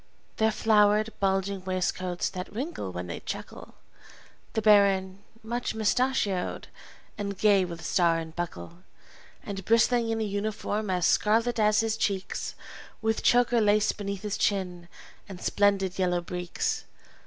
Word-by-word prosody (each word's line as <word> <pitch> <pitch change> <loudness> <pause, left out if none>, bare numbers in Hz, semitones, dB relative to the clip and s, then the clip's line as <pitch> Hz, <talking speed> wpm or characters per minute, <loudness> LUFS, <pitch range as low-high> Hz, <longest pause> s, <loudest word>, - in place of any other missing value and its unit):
Their 220 0 +3
flowered, 215 0 +3
bulging 195 0 0
waistcoats 185 -1 -1
that 185 0 -6
wrinkle 255 - -4
when 90 0 -5
they 85 - -6
chuckle; - - -8 0.8
The 220 - 0
baron, 195 -2 +4 0.2
much 235 +1 -3
mustachioed, 220 -3 0 0.5
and 200 -1 -3
gay 200 -3 +4
with 170 -2 -8
star 170 -2 +3
and 160 0 -6
buckle, 170 - -6 0.6
And 195 -2 -6
bristling 230 +2 +3
in 225 0 -1
a - - 0
uniform 210 0 -2
as 180 -2 +1
scarlet 230 +2 +2
as 215 0 +4
his 225 0 -1
cheeks, 195 -3 -2 0.5
With 220 0 +1
choker 245 -1 +4
lace 210 0 +3
beneath 200 -1 -5
his 210 0 -3
chin, 180 -4 -1 0.4
and 190 -2 -8
splendid, 195 -1 +1
yellow 180 -1 +1
breeks! 175 0 -3
200 Hz, 135 wpm, -27 LUFS, 185-220 Hz, 0.8 s, baron